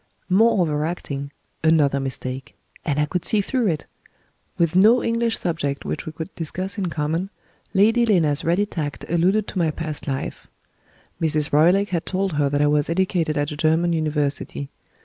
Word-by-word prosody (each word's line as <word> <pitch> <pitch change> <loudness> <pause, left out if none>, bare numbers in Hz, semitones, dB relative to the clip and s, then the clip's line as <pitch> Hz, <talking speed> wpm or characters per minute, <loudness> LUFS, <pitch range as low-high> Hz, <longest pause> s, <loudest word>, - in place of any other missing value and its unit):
More 215 +3 +4
over 150 -4 +1
acting! 140 -4 -4 0.3
Another 150 -4 +3
mistake! 130 -1 -5 0.3
And 145 -1 -1
I 150 - +3
could 180 +3 -3
see 215 - +2
through 235 +3 0
it! 155 -5 -1 0.7
With 170 -1 +1
no 220 +6 +6
English 230 -1 0
subject 155 -5 -2
which - - -4
we - - -3
could 160 +4 -7
discuss 185 +4 -3
in 190 - -1
common, 165 +3 -2 0.5
Lady 225 +5 +4
Lena's 160 -8 +2
ready 175 +5 +2
tact 150 -7 -5
alluded 185 +5 +2
to 185 - -3
my 165 -2 +2
past 155 -1 -5
life. 135 -1 -4 0.7
Mrs. 155 -2 +1
Roylake 180 +7 +4
had 170 -3 -2
told 190 -1 -1
her 145 -1 +1
that 145 +1 +1
I - - +4
was 145 0 +2
educated 170 -3 0
at 145 0 -1
a - - -4
German 160 +3 +2
University. 145 -3 -2
160 Hz, 170 wpm, -22 LUFS, 150-185 Hz, 0.7 s, no